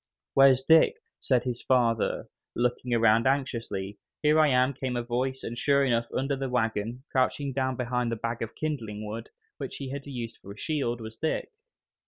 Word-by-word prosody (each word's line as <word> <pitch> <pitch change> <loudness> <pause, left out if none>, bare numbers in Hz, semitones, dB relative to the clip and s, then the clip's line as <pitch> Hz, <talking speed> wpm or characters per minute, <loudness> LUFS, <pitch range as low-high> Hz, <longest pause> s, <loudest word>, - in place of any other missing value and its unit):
"Where's 135 -1 +6
Dick?" 160 - +6 0.2
said 125 -3 +2
his 125 -2 -3
father, 120 -3 +1 0.3
looking 125 +1 -1
around 115 0 +4
anxiously. 115 -7 -2 0.2
"Here 150 +1 +5
I 155 - +6
am!" 130 0 +3
came 130 -1 -3
a 120 - -1
voice, 130 +2 -2
and 115 - -4
sure 140 +3 +3
enough, 115 -2 +1
under 135 +1 0
the 135 -1 -3
wagon, 115 0 -1
crouching 135 +1 +1
down 130 0 0
behind 125 -1 -1
the - - 0
bag 115 +1 -3
of 115 -1 -4
kindling 110 -9 -4
wood, 110 +2 -6 0.3
which - - -5
he 135 - -5
had 140 0 -6
used 120 -4 -5
for 100 - -10
a - - -18
shield, 120 -4 -1
was 110 0 -8
Dick. 160 - -2
125 Hz, 185 wpm, -28 LUFS, 115-135 Hz, 0.3 s, Where's